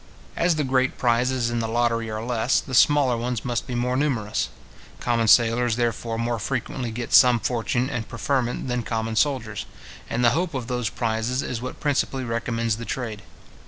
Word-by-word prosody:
As 170 Hz, -1 st, +2 dB
the 155 Hz, -, 0 dB
great 130 Hz, -1 st, +1 dB
prizes 125 Hz, 0 st, +1 dB
in 120 Hz, -, -1 dB
the 115 Hz, -, -1 dB
lottery 115 Hz, 0 st, 0 dB
are 110 Hz, 0 st, -4 dB
less, 120 Hz, 0 st, +1 dB
the 130 Hz, -, -8 dB
smaller 135 Hz, -1 st, +5 dB
ones 120 Hz, -1 st, -3 dB
must 120 Hz, -1 st, -2 dB
be 125 Hz, -, -4 dB
more 125 Hz, +1 st, 0 dB
numerous. 125 Hz, -, 0 dB, 0.5 s
Common 115 Hz, -2 st, +1 dB
sailors, 115 Hz, +2 st, +4 dB
therefore, 115 Hz, -1 st, -1 dB
more 115 Hz, 0 st, -1 dB
frequently 125 Hz, +1 st, -3 dB
get 120 Hz, +2 st, -5 dB
some 125 Hz, -2 st, +7 dB
fortune 120 Hz, +2 st, -1 dB
and 120 Hz, -5 st, -4 dB
preferment 125 Hz, +1 st, -1 dB
than 125 Hz, -1 st, -1 dB
common 115 Hz, 0 st, -3 dB
soldiers; 120 Hz, -4 st, 0 dB, 0.4 s
and 120 Hz, +1 st, +1 dB
the 120 Hz, -, +6 dB
hope 165 Hz, +2 st, -1 dB
of 130 Hz, -3 st, -3 dB
those 125 Hz, -3 st, -2 dB
prizes 115 Hz, +3 st, -1 dB
is 120 Hz, -2 st, -4 dB
what 130 Hz, -, -6 dB
principally 135 Hz, -2 st, 0 dB
recommends 115 Hz, -1 st, -1 dB
the 115 Hz, -, -6 dB
trade. 115 Hz, -5 st, -4 dB
120 Hz, 180 wpm, -24 LUFS, 115-130 Hz, 0.5 s, some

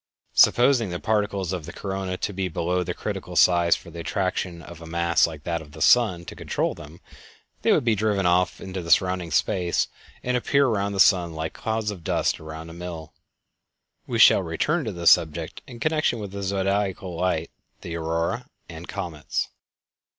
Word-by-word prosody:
Supposing 120 Hz, -3 st, +5 dB
the 85 Hz, 0 st, -4 dB
particles 100 Hz, -4 st, -1 dB
of 85 Hz, -5 st, -5 dB
the -, -, -6 dB
corona 95 Hz, -2 st, -4 dB
to 105 Hz, -, -3 dB
be 95 Hz, 0 st, -2 dB
below 90 Hz, +2 st, -1 dB
the 90 Hz, 0 st, -4 dB
critical -, -, -5 dB
size 85 Hz, -1 st, +5 dB
for 85 Hz, -, -11 dB
the 85 Hz, -, -8 dB
attraction 90 Hz, -1 st, -2 dB
of 85 Hz, 0 st, -11 dB
a 80 Hz, -, -9 dB
mass 85 Hz, 0 st, +2 dB
like 80 Hz, -3 st, -9 dB
that 85 Hz, -1 st, -2 dB
of 75 Hz, -2 st, -14 dB
the 80 Hz, -, -10 dB
sun 105 Hz, -9 st, +4 dB
to -, -, -8 dB
control -, -, -2 dB
them, 80 Hz, +2 st, -12 dB, 0.6 s
they -, -, +3 dB
would -, -, +3 dB
be 115 Hz, -, +4 dB
driven 105 Hz, -2 st, 0 dB
off 90 Hz, 0 st, +2 dB
into 95 Hz, -1 st, -5 dB
the 85 Hz, -, -8 dB
surrounding 90 Hz, -1 st, +2 dB
space 85 Hz, +3 st, +1 dB, 0.3 s
and 125 Hz, 0 st, 0 dB
appear 140 Hz, +3 st, +2 dB
around 100 Hz, -4 st, 0 dB
the 100 Hz, -, -4 dB
sun 90 Hz, -3 st, +4 dB
like 80 Hz, 0 st, -4 dB
the -, -, -15 dB
clouds 110 Hz, -1 st, -1 dB
of 90 Hz, -5 st, -9 dB
dust -, -, 0 dB
around 80 Hz, +1 st, -8 dB
a -, -, -10 dB
mill. 85 Hz, -3 st, -8 dB, 0.9 s
We -, -, -2 dB
shall -, -, +7 dB
return 140 Hz, -, -1 dB
to 110 Hz, -, -2 dB
this 85 Hz, -3 st, +4 dB
subject 80 Hz, -2 st, +1 dB
in 120 Hz, -, -10 dB
connection 155 Hz, -4 st, +1 dB
with 100 Hz, -3 st, -6 dB
the 100 Hz, 0 st, -6 dB
Zodiacal 95 Hz, -1 st, -1 dB
Light, 85 Hz, -2 st, -1 dB, 0.3 s
the 85 Hz, -, -6 dB
Aurora, 85 Hz, 0 st, -2 dB, 0.2 s
and 85 Hz, 0 st, -9 dB
Comets. 75 Hz, -4 st, -3 dB
90 Hz, 190 wpm, -24 LUFS, 85-100 Hz, 0.9 s, shall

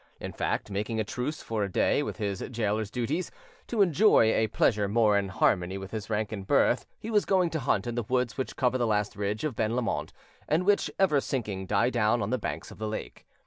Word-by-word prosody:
In -, -, -6 dB
fact, -, -, -2 dB
making 105 Hz, +3 st, -2 dB
a -, -, +2 dB
truce, 125 Hz, +8 st, -4 dB
for 110 Hz, -2 st, -2 dB
a 100 Hz, -, -3 dB
day, 145 Hz, -, +2 dB
with 145 Hz, -, -4 dB
his 100 Hz, -3 st, -3 dB
gaoler's 110 Hz, -2 st, -1 dB
duties, 130 Hz, +10 st, -2 dB, 0.4 s
to 220 Hz, -4 st, +3 dB
enjoy 170 Hz, -, +4 dB
a 110 Hz, -, +2 dB
pleasure 105 Hz, -1 st, +2 dB
more 105 Hz, 0 st, +3 dB
in 100 Hz, -1 st, +1 dB
harmony 95 Hz, 0 st, +1 dB
with 95 Hz, 0 st, -8 dB
his 110 Hz, -1 st, -5 dB
rank 110 Hz, 0 st, -1 dB
and 100 Hz, -3 st, -6 dB
birth, -, -, +3 dB
he 225 Hz, -, -6 dB
was 210 Hz, -2 st, +3 dB
going 185 Hz, -4 st, +2 dB
to 160 Hz, -, -1 dB
hunt 120 Hz, -7 st, 0 dB
in 120 Hz, -, -3 dB
the 120 Hz, -, -1 dB
woods 125 Hz, +1 st, -1 dB
which 130 Hz, -, -4 dB
cover 130 Hz, 0 st, +1 dB
the 120 Hz, -, +1 dB
last 105 Hz, -1 st, 0 dB
ridge 105 Hz, +3 st, -2 dB
of 150 Hz, -6 st, -2 dB
Ben 110 Hz, +1 st, 0 dB
Lomond, 125 Hz, -2 st, -2 dB, 0.4 s
and 165 Hz, +4 st, +2 dB
which, 205 Hz, 0 st, +3 dB
ever 155 Hz, -8 st, +3 dB
sinking, 105 Hz, -9 st, -3 dB
die 105 Hz, +5 st, +2 dB
down 120 Hz, 0 st, +2 dB
on 100 Hz, -, -3 dB
the 130 Hz, -, 0 dB
banks 80 Hz, -5 st, -5 dB
of -, -, -13 dB
the 110 Hz, -, -2 dB
lake. 110 Hz, -, -6 dB
110 Hz, 230 wpm, -28 LUFS, 105-130 Hz, 0.4 s, enjoy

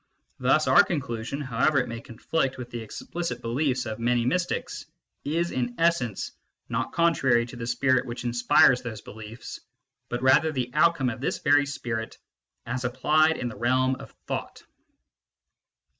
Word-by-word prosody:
Thus 135 Hz, +5 st, +3 dB
our 130 Hz, -, +8 dB
conclusion, 125 Hz, -, -3 dB
however 130 Hz, +3 st, +1 dB
it 125 Hz, -2 st, +2 dB
may 115 Hz, -1 st, -6 dB
conflict 135 Hz, +3 st, -2 dB
with 125 Hz, -2 st, -8 dB
the 120 Hz, -, -5 dB
explicit 170 Hz, +10 st, -5 dB
beliefs 125 Hz, +2 st, 0 dB
of 110 Hz, -1 st, -5 dB
many 120 Hz, 0 st, +1 dB
mystics, 175 Hz, +8 st, -2 dB, 0.4 s
is, 170 Hz, +4 st, -1 dB
in 120 Hz, -1 st, -2 dB
essence, 165 Hz, -, +1 dB, 0.4 s
not -, -, -2 dB
contrary 135 Hz, -8 st, +3 dB
to 120 Hz, -, -10 dB
the 115 Hz, -1 st, -5 dB
spirit 130 Hz, +1 st, +2 dB
which 120 Hz, +1 st, -6 dB
inspires 120 Hz, +1 st, +4 dB
those 115 Hz, -4 st, -6 dB
beliefs, 110 Hz, +2 st, -9 dB, 0.5 s
but 120 Hz, +1 st, -3 dB
rather 135 Hz, +4 st, +5 dB
the 125 Hz, -4 st, -3 dB
outcome 150 Hz, -5 st, +3 dB
of 120 Hz, -, -8 dB
this -, -, -1 dB
very 145 Hz, -1 st, +3 dB
spirit 115 Hz, -5 st, -4 dB, 0.5 s
as 125 Hz, +2 st, -3 dB
applied 155 Hz, +6 st, +2 dB
in 125 Hz, -, -3 dB
the 120 Hz, -, -6 dB
realm 130 Hz, +3 st, +2 dB
of -, -, -11 dB, 0.2 s
thought. -, -, -5 dB
125 Hz, 155 wpm, -26 LUFS, 120-145 Hz, 0.5 s, our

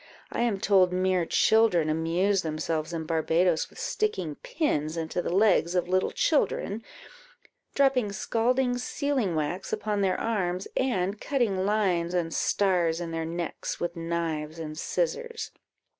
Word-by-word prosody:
I -, -, -2 dB
am 230 Hz, -5 st, +1 dB
told, 190 Hz, -2 st, +4 dB
mere 185 Hz, -2 st, +1 dB
children 220 Hz, -8 st, +4 dB
amuse 170 Hz, +5 st, +1 dB
themselves 155 Hz, 0 st, -2 dB
in 165 Hz, -2 st, -4 dB
Barbadoes 165 Hz, +1 st, +1 dB
with -, -, -18 dB
sticking 435 Hz, -3 st, -1 dB
pins 295 Hz, -, -2 dB
into 165 Hz, +2 st, -2 dB
the -, -, -3 dB
legs 185 Hz, -2 st, +3 dB
of 180 Hz, -, +1 dB
little 185 Hz, +1 st, +1 dB
children, 230 Hz, -8 st, 0 dB, 0.9 s
dropping 265 Hz, -6 st, +3 dB
scalding 245 Hz, +4 st, 0 dB
sealing 255 Hz, -, -1 dB
wax 155 Hz, +5 st, -2 dB
upon 210 Hz, -1 st, -1 dB
their 185 Hz, -1 st, +1 dB
arms, 185 Hz, -5 st, -1 dB
and 205 Hz, -6 st, 0 dB
cutting 210 Hz, -9 st, 0 dB
lines 180 Hz, -5 st, +1 dB
and 165 Hz, -2 st, -1 dB
stars 175 Hz, -5 st, +1 dB
in 170 Hz, -1 st, -4 dB
their 165 Hz, 0 st, -2 dB
necks 170 Hz, +1 st, -4 dB
with 175 Hz, 0 st, -3 dB
knives 165 Hz, -2 st, -3 dB
and 155 Hz, -2 st, -6 dB
scissors." 470 Hz, -, -2 dB
185 Hz, 140 wpm, -27 LUFS, 165-225 Hz, 0.9 s, told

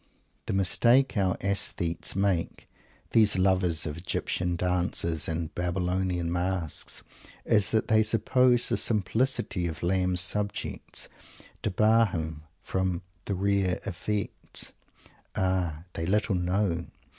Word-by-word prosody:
The -, -, -1 dB
mistake 120 Hz, +8 st, +4 dB
our 95 Hz, -3 st, +1 dB
"aesthetes" 95 Hz, -4 st, -1 dB
made, 95 Hz, -3 st, 0 dB, 0.5 s
these 110 Hz, -4 st, +4 dB
lovers 95 Hz, -3 st, +2 dB
of 75 Hz, 0 st, -4 dB
Egyptian 90 Hz, 0 st, -1 dB
dancers 85 Hz, -2 st, 0 dB
and 80 Hz, -1 st, -3 dB
Babylonian 90 Hz, -1 st, -1 dB
masks, 90 Hz, -2 st, -2 dB, 0.4 s
is 105 Hz, -2 st, +4 dB
that 110 Hz, -1 st, +1 dB
they 110 Hz, 0 st, +4 dB
suppose 120 Hz, +3 st, +3 dB
the -, -, +1 dB
simplicity 110 Hz, -3 st, 0 dB
of 80 Hz, -2 st, -6 dB
Lamb's 90 Hz, 0 st, +3 dB
subjects 100 Hz, +2 st, -3 dB, 0.5 s
debar 110 Hz, +3 st, +4 dB
him 80 Hz, -4 st, -4 dB, 0.2 s
from 95 Hz, -2 st, -1 dB, 0.2 s
the 100 Hz, -, -1 dB
rare 100 Hz, -1 st, +1 dB
effects. 105 Hz, +2 st, -3 dB, 0.6 s
Ah! 90 Hz, -4 st, 0 dB
They 80 Hz, 0 st, -3 dB
little 105 Hz, +2 st, +2 dB
know! 90 Hz, -1 st, 0 dB
95 Hz, 110 wpm, -28 LUFS, 85-105 Hz, 0.6 s, mistake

